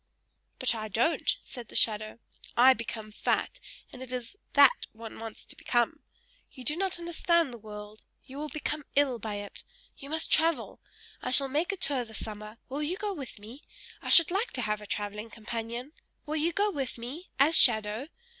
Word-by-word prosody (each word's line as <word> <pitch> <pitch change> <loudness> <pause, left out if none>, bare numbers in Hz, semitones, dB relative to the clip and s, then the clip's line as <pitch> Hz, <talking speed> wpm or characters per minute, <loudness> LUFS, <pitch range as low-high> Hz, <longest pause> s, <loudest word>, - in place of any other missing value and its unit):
"But 255 -2 +4
I 215 -1 -4
don't!" 235 - +1
said 245 -4 -9
the - - -13
shadow. 215 0 +2 0.4
"I 255 +2 +8
become 220 -3 -6
fat, - - -1 0.3
and 255 - -10
it 260 -1 -7
is 250 +7 -4 0.2
that 280 -2 +6
one 225 0 -9
wants 225 -1 -8
to - - -4
become! 240 +6 +1 0.5
You 255 - -10
do 295 +5 +2
not 380 0 -1
understand 340 -3 +1
the 235 - -9
world. 210 0 -10 0.2
You 270 +2 -9
will 300 0 -4
become 300 0 -3
ill 275 -4 +3
by 215 -1 -4
it. 205 0 -7 0.3
You 275 - -9
must 315 +1 0
travel! 325 0 +2 0.4
I - - -3
shall 270 +2 +4
make 310 +8 +1
a 395 - -4
tour 275 -7 +1
this 220 -2 -8
summer; 215 0 -8
will 275 +3 -4
you 325 +5 -1
go 410 0 -2
with 275 -10 -7
me? 225 +7 -11 0.4
I - - -5
should 335 0 +9
like 405 +6 0
to 250 - -2
have 210 0 -1
a 210 - -10
travelling 210 +2 -3
companion! 230 +4 -5 0.3
Will 305 - -3
you 320 +3 +2
go 410 +4 +1
with 275 -8 -3
me, 265 +10 -7
as 295 +5 +5
shadow? 220 +1 +4
255 Hz, 190 wpm, -29 LUFS, 220-305 Hz, 0.5 s, should